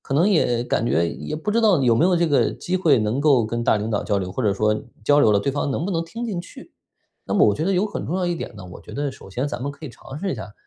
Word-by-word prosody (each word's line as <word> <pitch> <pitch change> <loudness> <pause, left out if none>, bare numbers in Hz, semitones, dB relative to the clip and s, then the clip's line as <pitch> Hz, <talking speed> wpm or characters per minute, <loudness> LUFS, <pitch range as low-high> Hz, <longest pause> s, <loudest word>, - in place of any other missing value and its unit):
可 135 - -4
能 170 +8 +4
也 125 - +2
感 115 - 0
觉 85 -4 +2
也 155 - -5
不 185 +7 -3
知 230 +2 +2
道 205 -9 +4
有 120 -3 +4
没 155 - +3
有 180 0 +3
这 170 0 +2
个 145 -3 +2
机 185 +1 -3
会 155 -8 +3
能 110 +5 0
够 135 -7 +4
跟 120 +1 -3
大 110 - +3
领 105 +1 -3
导 105 - 0
交 100 -2 0
流， 90 -1 -4
或 130 - -3
者 105 -3 +2
说 105 +2 +1 0.3
交 145 +4 +4
流 110 - +5
了 100 - +4
对 135 +7 -1
方 145 0 -1
能 150 - -2
不 200 - -2
能 165 -1 -1
听 230 +8 -6
进 200 -7 -3
去。 175 - -13 0.5
那 - - -4
么 - - +5
我 105 - +3
觉 155 - -2
得 195 - +1
有 190 +3 +2
很 - - -5
重 175 - -2
要 185 -1 0
一 175 - 0
点 160 - -7
呢， 95 - -9
我 - - -10
觉 - - -13
得 140 -1 -2
首 95 - -14
先 130 +8 -2
咱 130 - -5
们 140 - -2
可 145 +2 -10
以 - - -7
尝 135 +3 -10
试 190 +1 -2
一 - - -3
下， 105 +1 -8
140 Hz, 355 characters per minute, -22 LUFS, 110-175 Hz, 0.5 s, 流